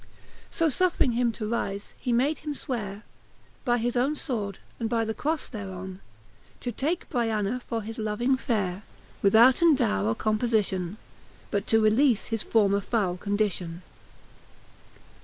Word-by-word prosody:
So 330 -4 +1
fufFring 320 -5 +2
him 240 0 +2
to 215 - -4
rife, 200 -3 -3
he 250 - -2
made 265 +5 +2
him 295 -1 -4
fweare 210 -7 -4 0.6
By 240 -2 +2
his 240 +1 -1
owne 265 +5 +2
fword, 215 - -3 0.2
and 225 -2 -1
by 230 -1 +1
the 220 - -2
croile 310 +7 0
thereon, 190 -4 -6 0.6
To 245 - -2
take 310 +10 -1
Br'tana 225 -2 0
for 225 -2 -2
his 225 +2 -6
loving 220 +5 +1
fere,, 200 -7 -1 0.4
Withouten 250 +10 +6
dowre 100 - +1
or 115 - +1
compofition; 215 -5 0 0.6
But 200 0 -1
to 225 - +4
releafe 230 +1 +3
his 225 -2 -1
former 200 -3 +2
foule 200 -4 0
condition. 190 -4 -1
225 Hz, 140 wpm, -27 LUFS, 200-245 Hz, 0.6 s, Withouten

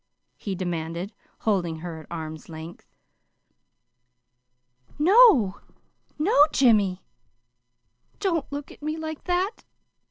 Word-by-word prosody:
he 195 -2 -5
demanded, 175 +1 -4 0.3
holding 180 -6 0
her 170 -2 -6
at 155 - -13
arm's 160 -1 -7
length. 160 +1 -10 2.1
"No, 305 - +5 0.6
no, 300 -2 +5
Jimmy! 205 -7 +3 1.2
Don't 335 -9 -1
look 285 0 -6
at - - -16
me 310 +1 -3
like 315 -1 -6
that. 365 +4 -1
210 Hz, 95 wpm, -25 LUFS, -, 2.1 s, No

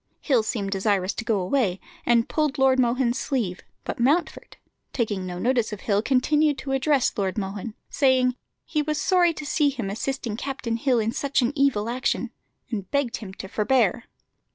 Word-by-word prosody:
Hill 260 -6 +2
seemed 205 -2 -3
desirous 195 -1 +1
to - - -5
go 225 -4 +1
away, 190 -1 0 0.3
and 235 -1 +4
pulled 305 -2 0
Lord 265 -1 +4
Mohun's 245 0 +2
sleeve; 210 -10 -2 0.2
but - - -5
Mountfort, 310 +7 0 0.4
taking 205 -7 -1
no 180 -1 -5
notice 240 +3 +1
of 210 - -6
Hill, 205 -1 +1
continued 290 +4 +2
to 270 - -5
address 270 0 +2
Lord 195 -1 -1
Mohun, 205 +2 -4 0.2
saying 255 -2 +3 0.3
he 305 - 0
was 305 0 -1
sorry 360 -2 +3
to 305 - -6
see 290 0 +2
him 235 -8 -4
assisting 235 0 -3
Captain 250 -3 -3
Hill 250 +1 +2
in 225 0 +1
such 275 +1 0
an 240 +4 0
evil 275 -7 +2
action, 245 0 -1 0.4
and 200 -5 -4
begging 245 -6 -1
him 190 - -10
to 190 - -7
forbear. 225 +1 +1
245 Hz, 175 wpm, -25 LUFS, 210-275 Hz, 0.4 s, and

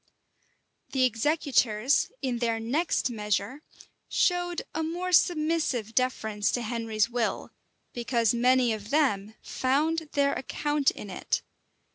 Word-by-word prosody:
[] - - -46
The 265 -1 +2
executors, 255 -2 +2
in 250 -3 -1
their 230 -1 0
next 265 +4 0
measure, 210 +4 -2 0.5
showed 355 -1 +1
a 320 - -2
more 350 +3 -3
submissive 310 - +2
deference 220 -5 0
to 245 - -1
Henry's 225 -2 0
will, 235 -2 -2 0.4
because 235 -2 +1
many 250 0 +3
of 210 -1 -7
them 220 -8 +1
found 310 +4 0
their 280 0 +2
account 295 +2 0
in 205 - -7
it. - - -2
255 Hz, 120 wpm, -27 LUFS, 225-300 Hz, 0.5 s, many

